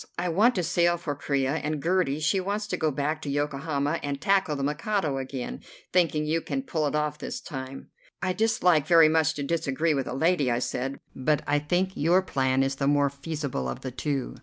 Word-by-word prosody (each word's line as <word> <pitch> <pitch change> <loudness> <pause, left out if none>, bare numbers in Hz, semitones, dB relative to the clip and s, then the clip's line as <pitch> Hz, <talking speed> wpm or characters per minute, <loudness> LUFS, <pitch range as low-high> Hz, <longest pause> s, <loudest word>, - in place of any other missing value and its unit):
I 175 0 -1
want 215 +9 +4
to 180 - 0
sail 175 0 +2
for 160 -3 -3
Corea, 140 0 -1
and 155 -1 -2
Gertie, 170 -3 +1
she 175 +5 +2
wants 200 +3 -2
to 185 - 0
go 160 -3 +1
back 150 +2 -2
to 145 - -5
Yokohama 145 +1 -1
and 140 -1 -3
tackle 190 -1 +2
the 140 - -3
Mikado 150 0 -1
again, 130 -1 -5 0.3
thinking 165 -4 +2
you 160 +2 0
can 270 - -3
pull 160 - -1
it 145 - -2
off 150 -1 -1
this - - -5
time." 135 -1 -7 0.3
"I 185 -1 -1
dislike 180 -8 +2
very 165 -3 +7
much 160 0 +2
to 145 - -3
disagree 155 +1 0
with 135 -3 -1
a - - -4
lady," 160 -2 +2
I 120 - +1
said, 130 +2 -3 0.2
"but 150 +3 +1
I 145 0 +2
think 175 +6 0
your 175 +4 +3
plan 130 -5 +1
is 135 0 -1
the 140 - 0
more 145 -1 +3
feasible 140 - -4
of 65 - -5
the 130 - -5
two. 135 +1 -3
150 Hz, 210 wpm, -27 LUFS, 140-175 Hz, 0.3 s, very